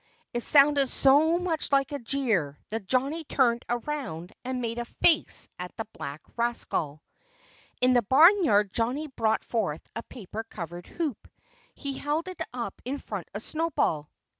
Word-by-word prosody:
It 240 - -1
sounded 280 0 +5
so 300 +5 +4
much 345 -4 0
like 275 +1 +3
a 285 - -3
jeer 225 - 0
that 215 -3 -4
Johnnie 275 - 0
turned 240 -5 +2
around 240 - -4
and 255 0 -3
made 235 -1 -3
a 240 - -3
face 315 +6 +2
at 180 0 -7
the 225 - -3
black 145 -1 -7
rascal. 200 -11 -1 0.8
In 255 0 +5
the 245 - +5
barnyard 260 - +5
Johnnie 260 +7 0
brought 220 -4 0
forth 190 -10 -2
a 230 - -3
paper 225 -2 -8
covered 175 -5 -8
hoop. 310 - -4 0.5
He 275 -2 -5
held 300 +4 -1
it 370 -2 -7
up 235 -5 -5
in 265 +4 -3
front 205 - -6
of 210 - -4
Snowball. 310 - -1
245 Hz, 155 wpm, -27 LUFS, 210-285 Hz, 0.8 s, sounded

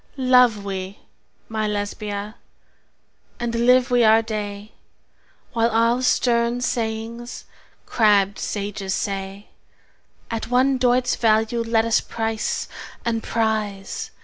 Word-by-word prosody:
Love 250 -5 +4
we 190 0 -5 0.5
(my 220 -1 -2
Lesbia!) 205 0 -4 1.1
and 240 -1 -2
live 245 +2 +3
we 245 -1 +4
our 220 +1 +5
day, 210 -1 -5 0.8
While 230 0 +2
all 230 +2 +2
stern 235 -1 +2
sayings 230 0 -3 0.4
crabbed 205 -3 +3
sages 200 -1 -3
say, 195 0 -4 0.8
At 225 -1 -3
one 255 +2 +2
doit's 250 0 +2
value 225 +1 +2
let 225 -1 +1
us 230 - +3
price 225 -1 -3 0.4
and 230 -1 0
prize! 215 -4 -2
225 Hz, 105 wpm, -22 LUFS, 205-235 Hz, 1.1 s, our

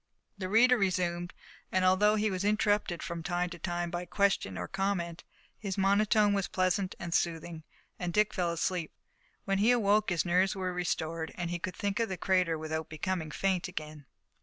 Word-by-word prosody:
The 185 -3 -5
reader 245 +4 +5
resumed, 180 -2 0 0.4
and, 185 0 +2
although 205 +3 +4
he 215 0 +1
was 185 0 -2
interrupted 205 -3 +1
from 170 -1 -4
time 175 +1 -1
to 175 - -8
time 175 0 -2
by 175 +1 -3
question 195 - +1
or - - -4
comment, 190 -4 -2 0.4
his 195 -3 -4
monotone 205 +1 +3
was 195 -2 0
pleasant 185 +1 0
and 170 -1 -4
soothing, 165 -1 -1 0.4
and 180 -1 -2
Dick 210 +3 +2
fell 175 -3 0
asleep. 170 0 -2 0.5
When 195 0 +1
he 215 +3 +4
awoke 215 -3 +3
his 175 -1 0
nerves 185 +3 +2
were 185 -1 -2
restored, 165 -2 -2
and 175 -1 -3
he 175 - -2
could 180 0 -4
think 200 +1 -2
of 230 - 0
the 190 - -3
crater 180 -4 +2
without 160 0 -4
becoming 160 +1 -3
faint 185 +3 0
again. 155 -5 -7
185 Hz, 185 wpm, -30 LUFS, 170-200 Hz, 0.5 s, reader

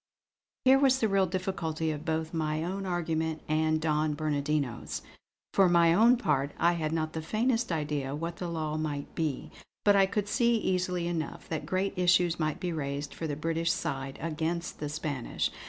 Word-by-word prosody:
Here 265 +1 +7
was 265 -2 +4
the 225 - +2
real 195 -2 +3
difficulty 165 -4 -2
of 150 0 -6
both 160 0 -1
my 155 -1 -1
own 190 +3 -3
argument 160 -3 -1
and 155 0 +2
Don 155 -1 +1
Bernardino's. 145 -4 -2 0.5
For 195 -2 +5
my 170 -1 +5
own 235 +6 +6
part, 145 - 0
I 170 +1 +3
had 160 -2 -2
not 155 -1 -1
the 160 - -3
faintest 225 +6 0
idea 150 -4 -1
of 145 - -4
what 170 +1 -4
the 180 - -4
law 155 -2 -2
might 150 -2 -3
be; 155 -5 -2 0.3
but 205 -1 +6
I 195 -1 +5
could 205 0 -1
see 235 +3 +3
easily 180 -4 0
enough 165 -4 -4
that 160 -2 -3
great 190 +1 0
issues 175 -2 +3
might 155 -2 -1
be 175 -2 -2
raised 140 -1 -3
for 165 - -4
the 145 - -2
British 165 +2 0
side 135 -3 -3
against 165 +2 -3
the 150 - -3
Spanish. 145 -4 -2
160 Hz, 185 wpm, -29 LUFS, 155-180 Hz, 0.5 s, Here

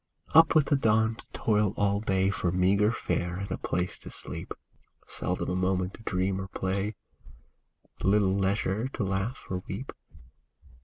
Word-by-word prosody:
Up 160 0 +7
with 155 -3 +6
the 145 - +2
dawn 110 -3 +3
to - - -13
toil 105 -2 +1
all 100 0 +2
day 95 -2 +1
For 90 -3 -1
meagre 100 +4 +3
fare 90 -6 -2
and 100 +2 -5
a - - -1
place 90 +1 -2
to - - -8
sleep; - - -8 0.5
Seldom - - -2
a 90 - 0
moment 90 0 0
to - - -11
dream 95 -2 -1
or 95 - -5
play, 95 +2 -2 1.1
Little 100 -1 +3
leisure 100 +3 0
to 110 - -2
laugh 95 +6 -2
or 90 -1 -2
weep. - - -5
100 Hz, 160 wpm, -28 LUFS, 95-105 Hz, 1.1 s, Up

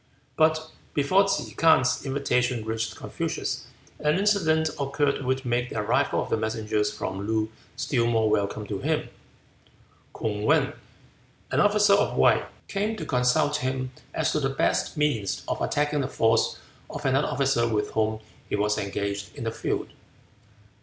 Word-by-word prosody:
But 155 0 +2 0.2
before 185 +8 +4
Ke 195 - -1
K'ang's 160 -6 +4
invitation 125 -4 0
reached 110 0 -2
Confucius - - -4 0.3
an 150 +2 +2
incident 165 -6 +2
occurred 140 0 0
which 130 +1 -1
made 120 0 0
the - - -5
arrival 105 - +1
of - - -9
the - - +2
messengers 110 -1 -1
from 100 -1 -4
Loo 110 0 0 0.2
still 125 -2 0
more 115 -2 +2
welcome 105 0 0
to 100 -1 -4
him. - - -1 1.1
K'ung 105 -2 -2
Wan, - - +3 0.8
an - - +2
officer 205 0 +5
of 205 +1 +2
Wei, - - +5 0.3
came 210 +3 -1
to 170 -7 -6
consult 125 +3 +2
him 130 -2 -2 0.2
as 160 - +1
to 150 - +1
the 135 -2 0
best 135 +3 0
means 145 -10 0
of - - -2
attacking 150 0 +1
the 130 - -1
force 115 -3 +2 0.3
of 145 0 -7
another 135 +2 +2
officer 135 -4 +1
with 105 -2 -1
whom 110 0 0 0.3
he - - 0
was 105 +1 +1
engaged 100 0 -3
in 115 - -6
a 115 - -1
feud. - - -3
130 Hz, 155 wpm, -26 LUFS, 110-150 Hz, 1.1 s, officer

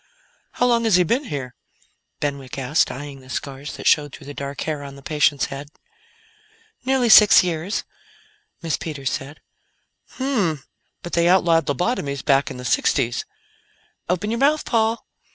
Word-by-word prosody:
"How 245 - +1
long 235 -1 +2
has 220 -5 +4
he 180 - +5
been 245 - 0
here?" 135 - -5 0.7
Benwick 140 -3 -4
asked, 135 +3 +1
eyeing 140 +1 -7
the 130 0 -17
scars 140 +2 -5
that - - -9
showed 145 -1 +3
through 145 - -14
the 145 - -8
dark 140 0 -6
hair 155 -2 -3
on 140 -1 -9
the 140 - -14
patient's 145 -2 +2
head. 140 +1 -8 1.1
"Nearly 260 -1 +2
six 210 -3 +8
years," 175 +2 -2 0.8
Miss 165 -2 -1
Peters 140 -5 -4
said. 140 +3 -6 0.7
"Hmmh! 245 - 0 0.5
But 175 - -8
they 170 0 +3
outlawed 170 -4 +3
lobotomies 145 - -1
back 140 -1 +3
in - - -7
the 125 - -8
sixties." 120 0 +1 0.8
"Open 185 +4 -1
your 230 - -1
mouth, 295 +3 +2
Paul." 225 -1 0
155 Hz, 155 wpm, -22 LUFS, 140-210 Hz, 1.1 s, six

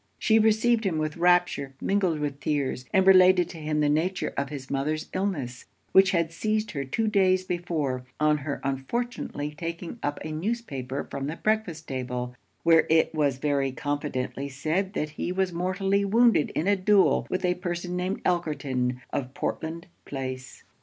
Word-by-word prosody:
She 220 -1 +4
received 220 +2 +3
him 185 -6 0
with 155 -1 -2
rapture 175 -6 +2
mingled 190 -5 +1
with 145 -2 -3
tears; 140 -4 -1
and 190 0 +4
related 185 -2 +6
to 165 - -9
him 150 0 -1
the 150 - +3
nature 165 +6 0
of 140 0 -2
his 140 -3 -7
mother's 150 +3 -2
illness, 150 -11 -3 0.3
which 190 0 +6
had 170 -3 +1
seized 215 +4 -1
her 140 -2 -3
two 220 +12 -1
days 190 -3 +3
before, 160 -8 -2 0.2
on 150 0 +3
her 145 0 -4
unfortunately 145 - -3
taking 170 +6 -6
up 145 0 -2
a 155 - -4
newspaper 155 - -3
from 140 0 -3
the 155 - -3
breakfast 200 -6 -1
table, 125 -2 -4 0.3
where 165 -1 +5
it 160 0 +3
was 145 -4 +1
very 140 -1 0
confidently 140 -1 -3
said 160 +8 -1
that 155 -7 -2
he 175 - -3
was 185 -1 0
mortally 195 +3 0
wounded 225 -4 +4
in 160 - 0
a 205 - +4
duel 195 +1 +3
with 185 0 -1
a 180 - +3
person 180 0 -4
named 180 +2 -2
Elkerton, 135 -8 0
of 130 -1 -3
Portland 165 +2 -3 0.2
Place. 130 -2 -6
160 Hz, 165 wpm, -26 LUFS, 140-190 Hz, 0.3 s, related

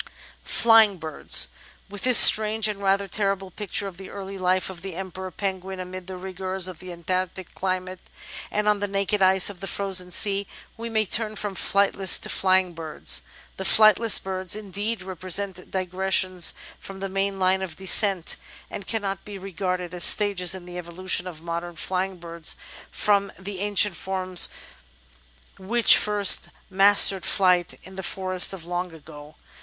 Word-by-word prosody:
§8 - - -21 0.4
Flying 225 -4 +5
Birds 155 - +1 0.4
With 200 0 -10
this 250 -3 +6
strange 215 0 +7
and 205 -2 -5
rather 195 0 0
terrible 195 -1 -2
picture 205 +1 -3
of 185 -3 -10
the 190 0 -11
early 195 -1 -8
life 185 0 0
of 175 -2 -11
the 190 -2 -8
Emperor 185 0 -7
Penguin 190 0 -5
amid 185 0 -8
the 190 -1 -7
rigours 185 0 -3
of 180 -3 -8
the 185 -1 -10
Antarctic 185 +1 -5
climate 185 -1 -4 0.5
and 210 0 -2
on 210 -1 +2
the 205 - -2
naked 195 +1 -2
ice 190 0 +5
of 190 - -14
the 195 - -7
frozen 190 -3 -2
sea, 200 +1 +3 0.3
we 230 +1 -7
may 220 -1 0
turn 215 +1 -1
from 205 -1 -5
flightless 195 -1 +2
to - - -5
flying 185 -1 +1
birds. 150 - -3 0.4
The 190 - -5
flightless 215 +2 +5
birds, 190 0 -3
indeed, 210 0 -4
represent 185 0 -5
digressions 185 -1 0 0.2
from 195 0 -11
the 195 - -4
main 195 +1 -3
line 190 0 +1
of 180 -4 -6
descent, 190 -1 +3 0.3
and 200 - -8
cannot 200 -3 -4
be 205 -1 -9
regarded 185 -2 -5
as 175 -1 -2
stages 190 -4 +4
in 185 -2 -10
the 180 0 -8
evolution 180 +1 -2
of 165 -3 -10
modem 170 +1 -5
flying 185 +3 -3
birds 170 -1 -5 0.3
from 200 -1 0
the 190 0 -8
an 205 0 -4
cient 205 0 +3
forms 185 +1 -3 1.1
which 230 +5 +5
first 205 -2 +3 0.2
mastered 195 -1 +4
flight 180 -3 +1
in 190 0 -14
the - - -4
forests 185 0 +2
of 185 -4 -8
long 175 +1 -4
ago. 150 -1 -14
190 Hz, 165 wpm, -23 LUFS, 180-200 Hz, 1.1 s, strange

